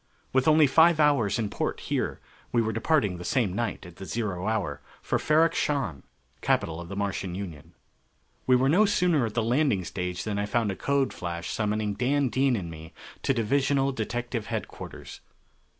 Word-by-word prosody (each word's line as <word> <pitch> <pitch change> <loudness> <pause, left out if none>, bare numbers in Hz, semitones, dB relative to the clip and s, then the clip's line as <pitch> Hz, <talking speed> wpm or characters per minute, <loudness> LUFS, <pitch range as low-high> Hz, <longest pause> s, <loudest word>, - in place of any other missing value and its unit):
With 130 +1 +2
only 155 0 +6
five 160 +4 +5
hours 140 -9 +3
in 110 -3 -2
port - - -2
here, - - -2 0.3
we 120 - +2
were 110 -1 0
departing 115 - +1
the - - -6
same 115 -5 +1
night 110 -2 -3
at 90 -1 -12
the 95 - -8
zero 100 -4 -3
hour 100 -10 -1 0.2
for - - -1
Ferrok 160 +2 +3
Shahn, 120 - -1 0.4
capital 80 +1 0
of 85 - -9
the 100 - -5
Martian 100 -2 -2
Union. 85 -7 -8 0.7
We 130 - +6
were 130 +1 +3
no 190 +9 +5
sooner 175 - +2
at 105 - -8
the 115 - +1
landing 120 -4 +2
stage 90 0 -4
than 105 -2 -2
I 105 - -1
found 110 -1 +1
a - - -4
code 140 +3 0
flash 85 0 -5
summoning 105 -1 -1
Dan 135 +4 +1
Dean 130 +1 +2
and 90 -6 -4
me 80 0 -10 0.3
to - - +1
Divisional 135 +3 +1
Detective 120 -1 -3
Headquarters. - - -7
115 Hz, 180 wpm, -27 LUFS, 95-135 Hz, 0.7 s, only